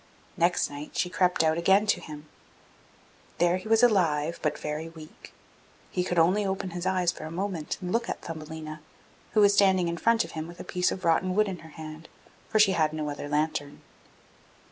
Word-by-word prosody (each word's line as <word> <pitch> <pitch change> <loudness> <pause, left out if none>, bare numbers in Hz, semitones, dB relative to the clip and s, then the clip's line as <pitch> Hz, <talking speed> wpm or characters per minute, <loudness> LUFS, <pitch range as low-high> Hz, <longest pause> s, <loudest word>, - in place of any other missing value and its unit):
Next 175 0 +2
night 145 +1 -8
she 180 - 0
crept 180 -3 +2
out 160 +1 +2
again 195 +4 +4
to 210 - +1
him. 150 0 -10 1.1
There 175 +1 +3
he 185 - -9
was 225 +2 +4
alive, 170 -8 +2
but 155 - -1
very 150 +2 -4
weak; 160 -2 -13 0.6
he 180 - 0
could 180 -1 -2
only 180 +6 +4
open 190 -1 -2
his 175 +1 -4
eyes 185 -2 +2
for 155 - -9
a - - -6
moment 175 -2 -3
and 180 0 -4
look 235 +2 0
at - - -3
Thumbelina, 155 -1 -7 0.5
who 215 - +4
was 200 0 +6
standing 190 -3 +4
in 170 0 -2
front 230 +4 +3
of - - -11
him 160 0 -5
with 175 +1 -12
a - - -6
piece 180 0 0
of 185 - -5
rotten 185 +3 +2
wood 215 0 +3
in 185 -3 -5
her 160 - -13
hand, 155 0 -10 0.4
for - - +1
she 210 -2 +6
had 155 -4 +1
no 155 -1 -3
other 145 0 -6
lantern. 150 -1 -1
170 Hz, 205 wpm, -27 LUFS, 155-190 Hz, 1.1 s, was